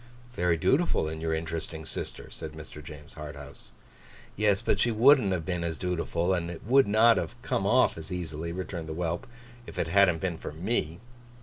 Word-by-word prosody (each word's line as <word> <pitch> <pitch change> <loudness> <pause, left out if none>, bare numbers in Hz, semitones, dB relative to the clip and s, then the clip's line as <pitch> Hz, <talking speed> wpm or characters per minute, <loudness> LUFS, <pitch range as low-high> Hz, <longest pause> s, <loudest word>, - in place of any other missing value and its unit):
'Very 90 -6 +1
dutiful 135 - +2
in 80 0 -5
your 80 0 -1
interesting 80 0 -3
sister,' - - -5
said 80 -1 -7
Mr. 75 -1 -10
James 75 -1 -11
Harthouse. 75 -2 -9 0.6
'Yes, 105 -1 +3
but - - +1
she 120 - +3
wouldn't 115 -1 +5
have 85 -4 -1
been 90 -1 -2
as 80 -2 -2
dutiful, 90 0 -1
and 85 -2 -1
it 85 +1 -8
would 135 +3 +5
not 110 +2 +5
have 120 +5 -3
come 120 -7 0
off 125 -5 +3
as 80 - -7
easily,' 85 -2 -4
returned 85 -2 -5
the - - -3
whelp, 85 +8 -2 0.4
'if - - -10
it 80 - -1
hadn't 95 -2 +5
been 90 -2 -3
for - - -6
me. 85 -1 -1
85 Hz, 190 wpm, -28 LUFS, 80-100 Hz, 0.6 s, wouldn't